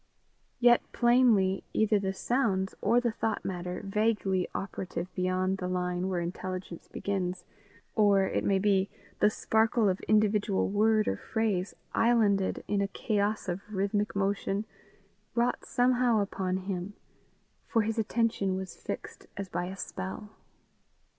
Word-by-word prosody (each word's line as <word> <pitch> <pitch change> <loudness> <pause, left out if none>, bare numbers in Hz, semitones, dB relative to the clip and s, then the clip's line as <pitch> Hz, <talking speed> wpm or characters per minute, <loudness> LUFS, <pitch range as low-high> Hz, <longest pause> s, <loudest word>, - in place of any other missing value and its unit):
Yet 240 -1 +6
plainly, 235 -6 +4
either 215 -1 +3
the 190 -1 -1
sounds, 195 -3 0
or 235 +4 +4
the 240 -1 0
thought 220 0 -2
matter 180 0 -4
vaguely 195 -3 +1
operative 185 -1 -4
beyond 185 +1 0
the 180 - -2
line 180 0 -1
where 180 -2 0
intelligence 180 0 -5
begins, 185 -2 -3 0.5
or, 205 -3 +4
it - - -1
may 195 - +3
be, 195 0 +2 0.3
the 210 - +5
sparkle 220 +1 +2
of 185 -1 +1
individual 210 -2 +2
word 215 +1 +3
or 95 - 0
phrase 205 - -1 0.2
islanded 215 -5 +2
in 205 -1 +1
a 200 - +1
chaos 205 +1 -1
of 180 +1 -2
rhythmic 205 +1 0
motion, 200 +1 0 0.7
wrought 240 +1 +1
somehow 245 -2 +3
upon 190 -2 -1
him, 190 +1 -4 0.7
for 225 -2 +2
his 225 +1 -1
attention 220 -3 0
was 190 0 -5
fixed - - -7
as 200 -1 -4
by 175 0 -2
a 190 +2 -6
spell. 190 +3 -6
200 Hz, 135 wpm, -29 LUFS, 190-220 Hz, 0.7 s, Yet